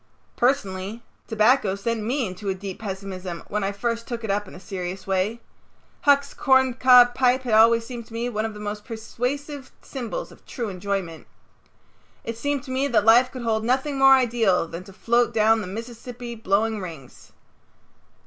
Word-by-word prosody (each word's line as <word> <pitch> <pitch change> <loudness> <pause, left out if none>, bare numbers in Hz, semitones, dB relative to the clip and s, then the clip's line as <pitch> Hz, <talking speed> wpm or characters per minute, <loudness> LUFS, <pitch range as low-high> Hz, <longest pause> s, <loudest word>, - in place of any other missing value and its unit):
Personally 220 -4 -1 0.2
tobacco 220 -2 +3
sent 225 +3 -2
me 250 +4 -1
into 190 +1 -5
a 190 - -1
deep 195 +1 -7
pessimism 190 -4 -6
when 210 0 -1
I 195 - 0
first 230 +3 -3
took 235 -2 -5
it 220 - -1
up 205 0 -1
in - - -12
a - - -10
serious 185 0 -6
way. 195 +4 -1 0.6
Huck's 280 -1 +4
corncob 255 -2 +5
pipe 255 +1 +2
had 240 -3 -2
always 230 +1 +5
seemed 235 -2 -8
to - - -15
me 235 +1 -2
one 215 -3 -2
of 220 -1 -4
the - - -9
most 210 0 -5
persuasive 255 +5 -5
symbols 270 - -5
of - - -18
true 235 -5 -4
enjoyment. 185 -3 -4 1.0
It 230 - -4
seemed 280 +3 -2
to 260 - -8
me 265 +2 0
that 215 -6 +2
life 240 +3 +6
could 255 -2 -7
hold 220 -1 0
nothing 265 +4 0
more 270 0 +8
ideal 230 -9 +2
than 170 +2 -7
to 195 - -12
float 235 +3 +1
down 220 0 +4
the 195 - -6
Mississippi 235 +3 -7
blowing 220 0 0
rings. 160 -8 -10
225 Hz, 175 wpm, -24 LUFS, 200-250 Hz, 1.0 s, more